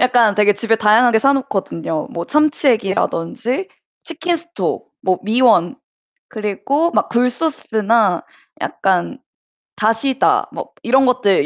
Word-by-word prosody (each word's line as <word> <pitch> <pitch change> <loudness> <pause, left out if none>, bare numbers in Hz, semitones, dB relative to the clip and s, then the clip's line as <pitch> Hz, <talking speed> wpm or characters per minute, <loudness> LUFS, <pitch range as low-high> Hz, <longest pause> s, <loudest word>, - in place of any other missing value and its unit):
약간 245 -4 +3
되게 210 0 +4
집에 225 +1 0
다양하게 220 +2 +4
사 275 +5 +3
놓거든요. 175 - -3
뭐 170 - -5
참치액이라든지 250 - 0 0.4
치킨스톡, 340 +1 -4
뭐 185 -1 +1
미원 220 -3 +2 0.5
그리고 235 - -1
막 - - +1
굴소스나 235 - 0 0.4
약간 190 +7 -1 0.6
다시다 225 +5 +1
뭐 - - -8
이런 265 +3 +3
것들 245 - +2
230 Hz, 250 characters per minute, -18 LUFS, 200-270 Hz, 0.6 s, 되게